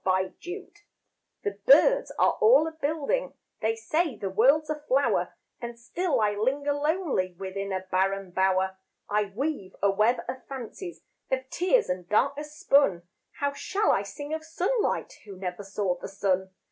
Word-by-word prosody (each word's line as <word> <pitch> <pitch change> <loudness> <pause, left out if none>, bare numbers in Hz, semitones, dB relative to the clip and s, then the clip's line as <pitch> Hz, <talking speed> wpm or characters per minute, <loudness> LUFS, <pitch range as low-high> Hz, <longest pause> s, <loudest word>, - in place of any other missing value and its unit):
The - - 0 0.3
Blind 390 +3 -8 0.6
The 410 - -3
birds - - +6
are - - +5
all 445 -7 +7
a - - -3
building, 315 - -1 0.3
They 225 0 +1
say 300 +6 0
the 195 -2 -3
world's 275 +10 +4
a 305 - -3
flower, 275 +2 +2 0.3
And 235 0 -6
still 275 +4 -1
I 210 -1 +3
linger 275 +7 0
lonely 290 - 0
Within 195 +1 -4
a 190 -1 -1
barren 190 0 -1
bower. 190 +1 +1 0.3
I 210 0 +2
weave 205 -1 -4
a 200 0 +3
web 215 +5 +2
of 255 +1 -5
fancies 275 - -7 0.3
Of 260 0 -1
tears 375 +8 +2
and 180 -1 -4
darkness 295 +7 0
spun. 235 -12 +4 0.4
How 285 0 +1
shall 400 +8 +1
I 195 - +2
sing 290 +9 -7
of 315 0 -3
sunlight 375 +9 -1
Who 200 -3 -10
never 180 0 -4
saw 195 -2 -2
the - - -6
sun? 190 -1 0
250 Hz, 160 wpm, -27 LUFS, 195-315 Hz, 0.6 s, all